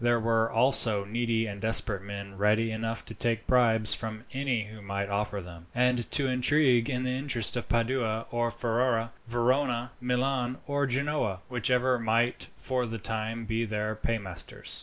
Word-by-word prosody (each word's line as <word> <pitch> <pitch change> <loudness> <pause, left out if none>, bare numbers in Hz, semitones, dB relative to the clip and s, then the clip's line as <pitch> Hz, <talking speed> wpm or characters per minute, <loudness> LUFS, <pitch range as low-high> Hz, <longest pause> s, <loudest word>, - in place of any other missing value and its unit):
There 120 0 +3
were 115 0 +1
also 115 -4 +4
needy 115 +1 0
and 100 -2 -7
desperate 110 -3 +4
men 100 0 -8
ready 105 +3 +2
enough 115 +1 -4
to - - -9
take 115 -1 -1
bribes 115 -4 +4
from 110 -1 -5
any 130 -4 -1
who 110 0 -11
might 100 0 -3
offer 105 0 -2
them, 85 -1 -12
and 125 -2 +1
to 140 -3 +5
intrigue 130 -1 +3
in 125 -2 -1
the 130 - -1
interest 130 -4 -1
of 120 - -4
Padua 115 -1 0
or 120 0 0
Ferrara, 115 0 0 0.2
Verona, 120 +1 0
Milan, 125 0 -1
or 145 0 0
Genoa 130 -7 -1
whichever 125 +1 +1
might 115 +2 0
for 125 -2 -2
the 115 0 -4
time 110 +1 -4
be 110 +1 -1
their 105 -1 -2
paymasters. 100 -5 -4
115 Hz, 160 wpm, -28 LUFS, 110-125 Hz, 0.2 s, to